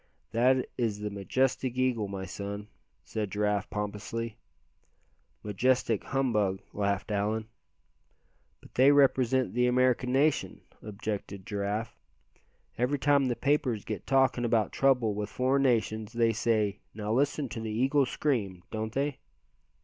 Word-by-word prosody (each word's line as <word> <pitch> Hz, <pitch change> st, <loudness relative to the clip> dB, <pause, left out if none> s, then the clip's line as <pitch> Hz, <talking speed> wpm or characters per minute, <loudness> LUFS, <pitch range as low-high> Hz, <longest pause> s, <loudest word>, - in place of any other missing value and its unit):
"That 125 Hz, +2 st, +3 dB
is 110 Hz, -4 st, -1 dB
the 105 Hz, 0 st, -3 dB
majestic 125 Hz, +5 st, 0 dB
eagle, 125 Hz, -5 st, +1 dB
my 95 Hz, -1 st, -5 dB
son," 100 Hz, +2 st, -6 dB, 0.3 s
said 105 Hz, -2 st, -3 dB
Giraffe, 105 Hz, 0 st, 0 dB
pompously. 105 Hz, +2 st, -4 dB, 1.1 s
"Majestic 115 Hz, +1 st, +1 dB
humbug," 105 Hz, -8 st, +1 dB
laughed 100 Hz, 0 st, -1 dB
Allan. 105 Hz, +2 st, 0 dB, 1.2 s
"But -, -, -17 dB
they 135 Hz, +3 st, +6 dB
represent 130 Hz, -3 st, +3 dB
the 125 Hz, +1 st, +2 dB
American 125 Hz, 0 st, +2 dB
nation," 140 Hz, +3 st, +1 dB, 0.2 s
objected 100 Hz, -2 st, -5 dB
Giraffe, 105 Hz, +3 st, -3 dB, 0.8 s
"every 125 Hz, +4 st, +1 dB
time 140 Hz, -1 st, +3 dB
the 120 Hz, -, 0 dB
papers 130 Hz, -6 st, 0 dB
get 105 Hz, -5 st, -5 dB
talkin' 135 Hz, -2 st, +3 dB
about 115 Hz, -2 st, +2 dB
trouble 125 Hz, -6 st, +2 dB
with 105 Hz, 0 st, -3 dB
foreign 130 Hz, +4 st, +1 dB
nations 110 Hz, -4 st, +1 dB
they 115 Hz, -1 st, +2 dB
say 105 Hz, -2 st, +1 dB, 0.2 s
'now 105 Hz, 0 st, -2 dB
listen 140 Hz, +2 st, +1 dB
to 115 Hz, -, -5 dB
the 110 Hz, -, -4 dB
eagle 130 Hz, +5 st, +2 dB
scream' 105 Hz, -12 st, -1 dB
don't 110 Hz, 0 st, -3 dB
they?" 140 Hz, +1 st, -1 dB
115 Hz, 130 wpm, -29 LUFS, 105-130 Hz, 1.2 s, they